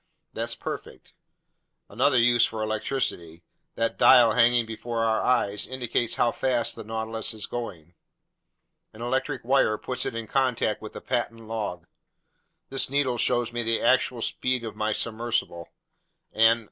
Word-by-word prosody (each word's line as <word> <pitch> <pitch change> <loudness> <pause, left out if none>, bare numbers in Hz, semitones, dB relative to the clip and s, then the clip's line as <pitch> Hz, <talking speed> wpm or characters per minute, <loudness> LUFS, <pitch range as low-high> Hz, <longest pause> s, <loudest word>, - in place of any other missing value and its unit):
"That's - - -2
perfect." - - -8 0.7
"Another 130 +5 +2
use 120 0 +5
for 110 -1 -1
electricity: 110 -7 -3 0.3
that 115 0 -1
dial 120 -3 +7
hanging 120 +1 +4
before 115 +1 -3
our 110 -1 +1
eyes 105 -5 +1
indicates 125 -2 -1
how 120 - +2
fast 120 -3 0
the - - -8
Nautilus 110 +1 -4
is 110 - -6
going. 90 -9 -7 1.0
An 110 +2 -8
electric 130 0 -2
wire 125 -4 +3
puts 130 +3 -4
it - - -5
in 115 -1 -4
contact 125 -3 0
with 110 - -8
the - - -8
patent 120 -2 -2
log; 110 -4 -5 0.8
this 135 -1 +1
needle 135 -3 0
shows 120 -1 +1
me 120 - -1
the 115 0 0
actual 125 -2 +2
speed 125 -1 -1
of 115 - -6
my 110 0 -1
submersible. 110 -6 -2 0.6
And. 115 +1 +5
115 Hz, 145 wpm, -26 LUFS, 110-125 Hz, 1.0 s, dial